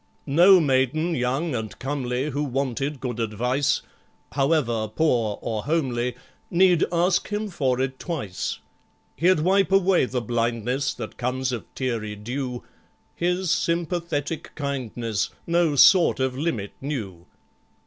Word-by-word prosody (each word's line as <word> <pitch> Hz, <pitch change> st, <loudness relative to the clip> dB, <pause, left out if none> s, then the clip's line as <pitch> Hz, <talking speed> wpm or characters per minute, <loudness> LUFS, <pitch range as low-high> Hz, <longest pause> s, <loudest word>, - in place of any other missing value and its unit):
No 175 Hz, +6 st, +6 dB
maiden 150 Hz, +3 st, +1 dB
young 135 Hz, +4 st, -1 dB
and 110 Hz, -3 st, -4 dB
comely 135 Hz, 0 st, -2 dB
Who 145 Hz, +2 st, -1 dB
wanted 135 Hz, +1 st, -2 dB
good 125 Hz, -3 st, -4 dB
advice 125 Hz, +5 st, 0 dB, 0.5 s
(However 135 Hz, -6 st, +1 dB
poor 110 Hz, -3 st, +1 dB
or 110 Hz, -2 st, -3 dB
homely) 125 Hz, -6 st, 0 dB, 0.3 s
Need 180 Hz, -1 st, +4 dB
ask 175 Hz, +1 st, +2 dB
him 210 Hz, 0 st, -3 dB
for 130 Hz, -8 st, 0 dB
it 130 Hz, 0 st, -2 dB
twice. 135 Hz, -, -4 dB, 0.6 s
He'd 180 Hz, -1 st, +3 dB
wipe 190 Hz, +3 st, +3 dB
away 195 Hz, -5 st, +4 dB
the 125 Hz, 0 st, -2 dB
blindness 120 Hz, +3 st, -1 dB
That 110 Hz, -3 st, -7 dB
comes 130 Hz, +1 st, -1 dB
of 120 Hz, -3 st, -6 dB
teary 115 Hz, -5 st, -2 dB
dew; 125 Hz, +3 st, -4 dB, 0.5 s
His 180 Hz, +1 st, 0 dB
sympathetic 170 Hz, -2 st, -2 dB
kindness 120 Hz, -7 st, -2 dB, 0.2 s
No 170 Hz, -3 st, +2 dB
sort 175 Hz, +3 st, +6 dB
of 130 Hz, -1 st, 0 dB
limit 130 Hz, -9 st, -2 dB
knew. 105 Hz, -, -5 dB
135 Hz, 125 wpm, -24 LUFS, 120-165 Hz, 0.6 s, No